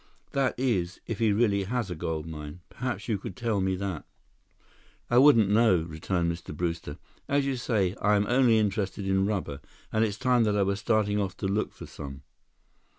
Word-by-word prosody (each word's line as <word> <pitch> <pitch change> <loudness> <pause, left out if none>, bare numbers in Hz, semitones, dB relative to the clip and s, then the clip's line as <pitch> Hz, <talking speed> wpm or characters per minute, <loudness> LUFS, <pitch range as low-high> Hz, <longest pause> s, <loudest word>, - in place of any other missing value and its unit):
That 135 -3 0
is, 95 -9 0
if 115 - -4
he 110 -2 +3
really 100 -2 +2
has 115 -2 -2
a - - -3
gold 80 0 -3
mine. 75 +1 -8
Perhaps 125 0 -4
you 110 -4 0
could 95 - -7
tell 115 -4 -1
me 95 0 +1
that?" 95 -4 -4 1.1
"I 120 - +6
wouldn't 130 -7 +6
know," 105 -5 +4
returned 85 +2 -1
Mr. 85 -3 -7
Brewster. 85 -4 -3 0.3
"As 140 0 +2
you 135 -1 0
say, 105 -6 0
I 105 0 +4
am 100 0 +2
only 120 -1 +4
interested 100 -2 -1
in 95 0 +2
rubber. 90 -9 -3 0.3
And 110 - +3
it's 105 -2 -1
time 125 -2 +3
that 105 -1 +1
I 100 - +3
was 100 +1 -1
starting 105 -1 +1
off 95 -2 -2
to 95 - -2
look 105 +2 -1
for - - -10
some." 70 -1 -9
100 Hz, 195 wpm, -28 LUFS, 90-115 Hz, 1.1 s, I